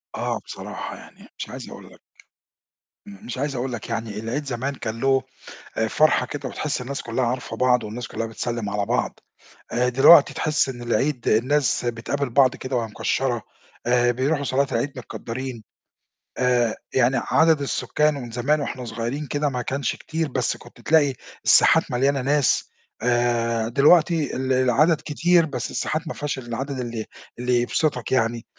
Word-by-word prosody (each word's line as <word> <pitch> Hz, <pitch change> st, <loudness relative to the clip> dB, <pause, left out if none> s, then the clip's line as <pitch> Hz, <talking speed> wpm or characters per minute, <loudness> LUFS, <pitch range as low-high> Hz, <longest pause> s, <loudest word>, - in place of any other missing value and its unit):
آه، -, -, -2 dB
بصراحة -, -, -7 dB
يعني -, -, -15 dB
مش -, -, -5 dB
عايز -, -, -8 dB
أقول -, -, -12 dB
لك، -, -, -19 dB, 1.1 s
م 100 Hz, -1 st, -12 dB
مش 120 Hz, +1 st, -5 dB
عايز 140 Hz, +1 st, -2 dB
أقول 125 Hz, +1 st, -3 dB
لك 120 Hz, -, -6 dB
يعني 115 Hz, -2 st, -3 dB
العيد 120 Hz, +7 st, -3 dB
زمان 135 Hz, +2 st, -3 dB
كان 115 Hz, -2 st, -5 dB
له 135 Hz, -1 st, +3 dB, 0.5 s
آآ 110 Hz, -, +1 dB
فرحة 155 Hz, +6 st, +3 dB
كده، 145 Hz, -, -5 dB
وتحس 150 Hz, -4 st, -3 dB
الناس 135 Hz, +2 st, -4 dB
كُلّها 120 Hz, +2 st, -1 dB
عارفة 125 Hz, +1 st, -3 dB
بعض 125 Hz, -2 st, +3 dB
والناس 110 Hz, +3 st, -5 dB
كُلّها 115 Hz, -, -3 dB
بتسلِّم 115 Hz, -1 st, -3 dB
على 100 Hz, 0 st, -1 dB
بعض، -, -, -1 dB, 0.5 s
آآ 125 Hz, +1 st, +2 dB
دلوقتي 135 Hz, +4 st, +7 dB
تحس 155 Hz, -3 st, +1 dB
إن 120 Hz, -2 st, -6 dB
العيد 120 Hz, +3 st, 0 dB
الناس 125 Hz, +2 st, +2 dB
بتقابل 120 Hz, +4 st, -2 dB
بعض 130 Hz, +1 st, +4 dB
كده 130 Hz, 0 st, -3 dB
وهي 115 Hz, -2 st, 0 dB
مكشَّرة، 120 Hz, +2 st, -1 dB, 0.4 s
آآ 120 Hz, 0 st, +3 dB
بيروحوا 140 Hz, +4 st, 0 dB
صلاة 140 Hz, +1 st, +1 dB
العيد 145 Hz, 0 st, -1 dB
متكدَّرين. 125 Hz, 0 st, -6 dB, 0.8 s
آآ 125 Hz, -3 st, +2 dB, 0.2 s
يعني 130 Hz, +1 st, +3 dB
عدد 160 Hz, -2 st, +3 dB
السكان 150 Hz, +2 st, 0 dB
ومن 125 Hz, -4 st, -7 dB
زمان 140 Hz, +6 st, +1 dB
وإحنا 130 Hz, -3 st, -4 dB
صغيرين 120 Hz, +6 st, -4 dB
كده 145 Hz, +1 st, 0 dB
ما 125 Hz, -2 st, -3 dB
كانش 140 Hz, +3 st, -2 dB
كتير، 160 Hz, 0 st, -3 dB
بس 135 Hz, -, -1 dB
كنت -, -, -16 dB
تلاقي 150 Hz, -4 st, +3 dB, 0.3 s
الساحات -, -, +5 dB
مليانة 135 Hz, +2 st, +1 dB
ناس، 140 Hz, +1 st, +2 dB, 0.3 s
آآ 120 Hz, -2 st, +1 dB
دلوقتي 155 Hz, +4 st, +4 dB
ال 130 Hz, 0 st, 0 dB
العدد 135 Hz, +5 st, +3 dB
كتير 170 Hz, +3 st, +3 dB
بس 130 Hz, -6 st, -4 dB
الساحات 160 Hz, +1 st, -2 dB
ما -, -, -3 dB
فيهاش 145 Hz, -2 st, -3 dB
العدد 130 Hz, +3 st, -4 dB
اللي 115 Hz, -3 st, -4 dB, 0.3 s
اللي 125 Hz, 0 st, +2 dB
يبسطك 125 Hz, 0 st, -1 dB
يعني. 115 Hz, -2 st, +1 dB
130 Hz, 165 wpm, -23 LUFS, 120-145 Hz, 1.1 s, دلوقتي